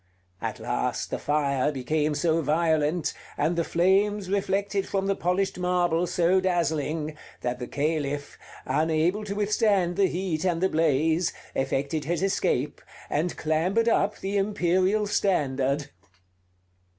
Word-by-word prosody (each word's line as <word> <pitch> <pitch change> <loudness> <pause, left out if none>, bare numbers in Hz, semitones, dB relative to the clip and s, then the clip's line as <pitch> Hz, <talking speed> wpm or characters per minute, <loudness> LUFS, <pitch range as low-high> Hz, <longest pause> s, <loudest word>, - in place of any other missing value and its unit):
At - - -4
last - - -2
the - - -2
fire 145 -1 +1
became 150 +3 -1
so 165 +2 +1
violent, 155 +1 +1 0.2
and 155 +4 +1
the 170 - +1
flames 190 +3 +2
reflected 200 0 0
from 195 -1 -1
the 195 0 +1
polished 180 +2 -1
marble 180 -1 +1
so 180 +1 +3
dazzling, 160 -3 -1 0.3
that 125 0 -2
the 125 - -5
Caliph, 145 -1 -2 0.3
unable 160 +8 +1
to 200 -1 -4
withstand 205 -4 +1
the 195 - +4
heat 175 -4 -2
and 175 -3 +1
the 190 +2 +2
blaze, 160 +1 +2 0.2
effected 140 +3 -1
his 175 +3 -1
escape, 150 -7 0 0.3
and 160 +4 -1
clambered 175 +9 +1
up 210 -2 +2
the 195 +1 -2
imperial 195 +1 +1
standard. 140 -8 0
170 Hz, 130 wpm, -26 LUFS, 150-190 Hz, 0.3 s, the